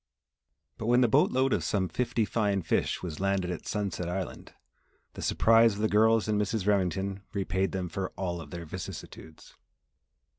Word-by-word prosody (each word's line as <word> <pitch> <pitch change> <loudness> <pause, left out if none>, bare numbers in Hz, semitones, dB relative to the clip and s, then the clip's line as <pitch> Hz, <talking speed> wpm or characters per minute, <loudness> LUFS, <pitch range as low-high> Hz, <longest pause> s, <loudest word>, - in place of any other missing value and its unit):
But 110 - -4
when 120 +1 +4
the 125 - +5
boatload 130 +4 +3
of - - 0
some 95 -3 0
fifty 120 +1 0
fine 100 -2 0
fish 80 - 0
was 80 -4 -5
landed 95 -2 0
at 90 - -6
Sunset 95 -5 -2
Island, 95 0 -5 0.6
the - - -8
surprise 115 0 +4
of - - -7
the 110 - +3
girls 110 +2 +3
and 105 -1 +1
Mrs. 105 -1 -1
Remington 95 -1 0
repaid 95 -1 -1
them 95 -2 -3
for 95 +3 -3
all 85 -3 -3
of 75 - -10
their 85 +2 -7
vicissitudes. 80 0 -9
100 Hz, 170 wpm, -29 LUFS, 90-110 Hz, 0.6 s, the